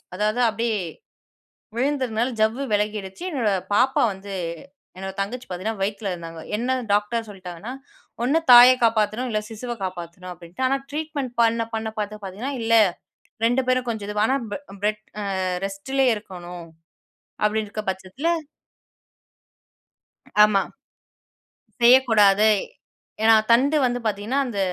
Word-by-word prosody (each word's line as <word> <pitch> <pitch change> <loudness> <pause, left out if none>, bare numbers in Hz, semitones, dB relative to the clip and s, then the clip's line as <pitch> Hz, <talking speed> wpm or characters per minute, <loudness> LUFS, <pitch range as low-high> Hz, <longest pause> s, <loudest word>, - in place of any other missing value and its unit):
அதாவது, 215 +5 0
அப்படியே 225 0 -1 1.0
விழுந்ததுனால 255 -3 0
ஜவ்வு 220 +5 +2
விலகிடுச்சு. 210 - -2
என்னோட 250 -9 0 0.2
பாப்பா 255 +5 +3
வந்து, 195 +1 -9 0.6
என்னோட 190 +1 -5
தங்கச்சி 240 +6 -4
பாத்தீங்கன்னா 195 +4 -4
வயித்துல 200 0 -2
இருந்தாங்க. 165 -1 -8 0.2
என்ன 255 +3 0 0.2
டாக்டர் 215 +2 0
சொல்லிட்டாங்கன்னா, 185 +2 -8 0.5
ஒண்ணு 280 +6 +3
தாய 245 +1 +11
காப்பாத்தணும். 225 +2 +1
இல்ல, 215 -1 0
சிசுவை 240 +2 -5
காப்பாத்தணும். 180 0 -7
அப்பிடின்ட்டு 175 +7 -6
ஆனா, 275 +1 +1
ட்ரீட்மெண்ட் 295 -4 -3
பண்ண, 230 0 +2
பண்ண 220 0 -2
பாத்து 210 0 -4
பாத்தீங்கன்னா, 205 +9 -5
இல்ல, 230 0 +2 0.7
2 245 +3 +2
பேரும் 255 0 +2
கொஞ்சம் 220 -3 -3
இதுவா, 210 0 +1
ஆனா 265 - +2
அம் 225 -3 -8
பெ - - -2 0.2
பெட் 215 +1 0 0.2
அ - - -3 0.4
ரெஸ்ட்டிலயே 255 +7 0
இருக்கணும். 180 -4 -9 0.8
அப்பிடீன்டுருக்கிற 215 0 -2
பட்சத்தில 190 - -5 2.2
ஆமா. 205 -2 +3 1.2
செய்யக்கூடாது. 220 -5 +6 0.7
ஏன்னா, 225 0 +7 0.2
தண்டு 275 +6 +4
வந்து 245 0 -1
பாத்தீங்கன்னா, 215 +6 0
அந்த 230 -5 -5
220 Hz, 120 wpm, -23 LUFS, 200-245 Hz, 2.2 s, தாய